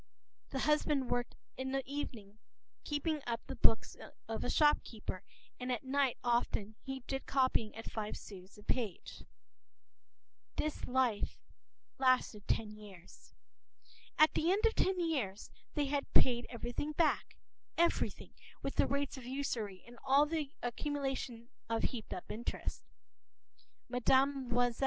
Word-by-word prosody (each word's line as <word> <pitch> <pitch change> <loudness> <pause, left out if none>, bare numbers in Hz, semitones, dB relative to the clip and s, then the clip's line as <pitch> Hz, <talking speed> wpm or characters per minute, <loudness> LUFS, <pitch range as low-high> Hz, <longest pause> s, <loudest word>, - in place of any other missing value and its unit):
p> 270 - -3
The - - 0
husband 300 -3 +2
worked 245 0 0 0.2
in 265 0 -2
the 270 0 +1
evening 225 -7 -5 0.4
keeping 295 +1 -1
up 230 -1 0
the - - -5
books - - +4 0.3
of - - -3
a - - -1
shopkeeper, 230 - +2 0.4
and 250 0 -2
at 245 - -1
night 270 -1 +2
often 235 -3 +1
he 270 -1 -5
did 270 0 -3
copying 255 -5 +2
at 225 - -7
five 215 -1 -3
sous 190 -1 -11
the 210 - -14
page. 215 -5 -2
And - - -15 1.4
this 305 - -3
life 250 -4 +1 0.6
lasted 255 -5 +3
ten 215 -2 +1
years. 195 -5 -14 0.8
At 310 0 +7
the 330 +3 +3
end 410 +4 +2
of 450 - +5
ten 375 -1 +2
years 265 - -1 0.2
they 295 -2 +2
had 280 0 -1
paid 240 -2 +5
everything 245 +5 -3
back, 320 +1 +2 0.4
everything, 340 0 +1 0.3
with - - -3
the - - +5
rates 280 0 -1
of 255 - -9
usury 235 -8 -3
and 240 0 -13
all 275 +2 +6
the 305 -2 -1
accumulation 260 -2 -2 0.2
of 230 0 0
heaped 230 -4 -2
up 180 - -4
interest. 235 +3 -3 1.1
Mme. 250 0 +3
255 Hz, 140 wpm, -35 LUFS, 230-285 Hz, 1.4 s, At